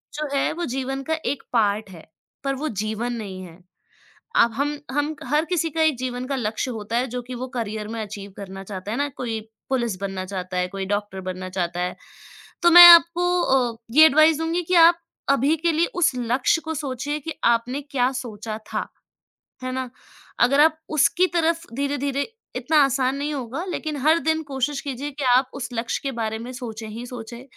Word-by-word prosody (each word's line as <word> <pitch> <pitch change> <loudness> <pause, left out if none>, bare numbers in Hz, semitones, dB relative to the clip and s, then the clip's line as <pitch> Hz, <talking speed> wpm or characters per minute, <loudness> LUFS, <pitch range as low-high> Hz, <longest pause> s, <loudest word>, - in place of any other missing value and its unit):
जो 305 0 -3
है, 275 - +1
वो 345 +2 -3
जीवन 270 +1 -3
का 320 - +2 0.2
एक 285 - -13
पार्ट 210 -2 +1
है, 165 -3 -12 0.4
पर 275 0 -1
वो 305 +4 -3
जीवन 220 +3 -2
नहीं 200 -5 -6
है। 170 -1 -13 0.8
अब 230 0 +2
हम 290 +3 -1
हम, 290 +2 0
हर 295 +5 +2
किसी 335 -2 0
का 320 +2 0
एक 315 -4 +3
जीवन 250 0 -4
का 275 +1 -2
लक्ष्य 225 +1 -2
होता 220 -1 -4
है, 250 +2 +1
जो 250 +1 -4
कि 250 +1 -8
वो 255 +2 -5
करियर 215 -2 -4
में 225 +1 -5
अचीव 200 -1 -8
करना 195 -1 -8
चाहता 190 0 -7
है - - -2
ना। 285 0 0
कोई 230 -3 -3 0.3
पुलिस 235 -6 0
बनना 195 -1 -4
चाहता 185 -1 -5
है, 180 0 0
कोई 195 0 -5
डॉक्टर 205 -1 -3
बनना 185 0 -6
चाहता 175 -1 -2
है, 180 0 -2 0.7
तो 345 - +6
मैं 350 +1 +12
आपको 345 +1 +6
अ, 250 -6 +1 0.2
ये 310 +5 +8
एडवाइस 310 +1 +5
दूँगी 330 +2 -1
कि 365 - 0
आप 340 0 0 0.3
अभी 275 +3 +3
के 335 +2 +1
लिए 325 +2 +2
उस 355 -6 +3
लक्ष्य 245 +6 +1
को 320 0 -3
सोचिए 285 0 -3
कि 320 +3 -5
आपने 235 +3 +2
क्या 265 -3 0
सोचा 220 -3 -6
था। - - -2 0.8
है 255 - -3
ना? 260 -1 -3 0.5
अगर 275 +4 +5
आप 315 +1 +4 0.2
उसकी 355 +5 +4
तरफ 330 0 +1
धीरे-धीरे 280 0 -1 0.3
इतना 255 +5 +1
आसान 265 0 0
नहीं 290 +2 -2
होगा, 265 +3 -4
लेकिन 315 -4 -4
हर 315 +4 +4
दिन 320 0 0
कोशिश 275 0 -2
कीजिए 280 0 -5
कि 285 +1 -6
आप 255 +1 +2
उस 255 -3 -5
लक्ष्य 230 0 -2
के 275 - -2
बारे 220 0 -2
में 240 +2 -7
सोचें 225 -3 -7
ही 230 +3 -7
सोचें। 240 0 -8
255 Hz, 200 wpm, -23 LUFS, 220-295 Hz, 0.8 s, मैं